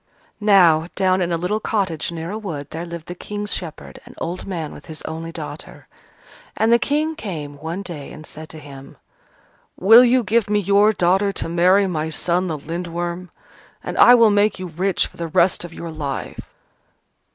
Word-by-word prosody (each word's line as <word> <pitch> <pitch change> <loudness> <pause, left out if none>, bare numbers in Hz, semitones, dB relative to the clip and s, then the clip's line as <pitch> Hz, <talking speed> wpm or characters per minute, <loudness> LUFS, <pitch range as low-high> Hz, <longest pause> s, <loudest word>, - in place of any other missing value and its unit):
Now, 175 -6 +5
down 185 -1 +2
in 175 -1 -1
a 170 - +1
little 180 +6 -1
cottage 185 -9 -2
near 165 +1 -5
a 210 - -4
wood, 150 -9 -6
there 165 +2 -5
lived 170 -1 -7
the 175 - -6
King's 205 +3 -4
shepherd, 165 -4 -7
an - - -15
old 175 +2 -5
man 165 -6 -4
with 145 - -13
his 155 -1 -6
only 165 +1 -6
daughter. - - -9 0.7
And 225 +1 +3
the 235 - +5
King 305 +5 0
came 150 - -6
one 165 +5 -4
day 155 -7 -7
and 155 - -11
said 155 +1 -11
to 160 - -9
him, 140 -3 -12 0.8
"Will 225 +6 +8
you 250 0 +3
give 220 0 +1
me 210 - +2
your 200 +2 +4
daughter 190 +1 +2
to - - -2
marry 180 +4 +4
my 160 -4 -2
son 175 +3 0
the 160 -3 -3
Lindworm? 170 +3 -5 0.5
And - - -5
I 245 - +9
will 230 -3 +5
make 205 0 +2
you 185 - -6
rich 185 +3 0
for - - -14
the 170 - -3
rest 170 +3 +2
of 175 - -8
your 165 0 -7
life." 145 -3 -5
175 Hz, 190 wpm, -21 LUFS, 160-205 Hz, 0.8 s, I